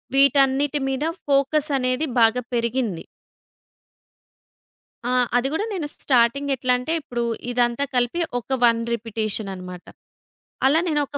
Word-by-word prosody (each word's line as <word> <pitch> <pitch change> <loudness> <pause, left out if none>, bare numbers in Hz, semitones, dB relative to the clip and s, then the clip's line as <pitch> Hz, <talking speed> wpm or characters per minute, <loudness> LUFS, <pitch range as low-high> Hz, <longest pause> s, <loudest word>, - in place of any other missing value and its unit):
వీటన్నిటి 275 +1 +3
మీద 270 +3 -1 0.2
ఫోకస్ 280 +2 +2
అనేది 255 +4 0 0.2
బాగా 230 +2 +4
పెరిగింది. 235 -6 -1 2.1
ఆ! - - 0 0.3
అది 255 +2 +2
గూడా 325 +7 -1
నేను 320 -5 -3
స్టార్టింగ్ 260 +2 +2
ఎట్లంటే, 250 +5 0
ఇప్పుడూ 240 -5 -3 0.3
ఇదంతా 245 +2 +1
కలిపి 245 +7 0 0.2
ఒక 265 +2 -3
1 230 -1 +4
రిపిటీషననమాట. 205 -5 -4 0.8
అలా 290 +5 +4
నేనొక 290 -2 -1
255 Hz, 105 wpm, -23 LUFS, 235-280 Hz, 2.1 s, బాగా